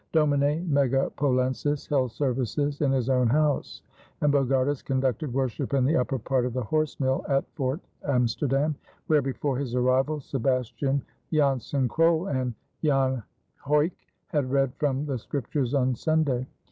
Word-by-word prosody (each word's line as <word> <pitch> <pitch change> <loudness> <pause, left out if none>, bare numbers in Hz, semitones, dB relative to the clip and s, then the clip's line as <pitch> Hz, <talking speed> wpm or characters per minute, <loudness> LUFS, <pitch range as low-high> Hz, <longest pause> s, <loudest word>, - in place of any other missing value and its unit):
Domine 150 +2 +2
Megapolensis 135 0 +1
held 130 -4 +1
services 140 +3 -1
in 140 -3 +3
his 130 -3 0
own 125 -2 +3
house, 150 +3 0 0.4
and 145 -1 +3
Bogardus 135 0 +2
conducted 135 +2 -1
worship 135 +1 -1
in 130 -2 +3
the 155 +5 +2
upper 135 -1 +1
part 130 +2 0
of 125 -1 -2
the 125 0 -1
horse 155 +5 -1
mill 130 -1 +1
at 135 -1 +2
Fort 135 +3 -1 0.2
Amsterdam, 135 +3 +1 0.3
where 155 -2 +3
before 135 0 -2
his 130 -3 -3
arrival 130 +4 +2
Sebastian 135 +1 -1 0.3
Jansen 140 -3 +1
Krol 165 +4 +2
and 130 -3 -1 0.3
Jan 135 -4 +2 0.4
Huyck 150 +4 +2 0.3
had 145 -5 -1
read 135 -1 +1
from 140 -1 0
the 135 -4 -2
Scriptures 135 +1 -2
on 130 -1 +2
Sunday. 140 -3 0
135 Hz, 145 wpm, -26 LUFS, 130-145 Hz, 0.4 s, in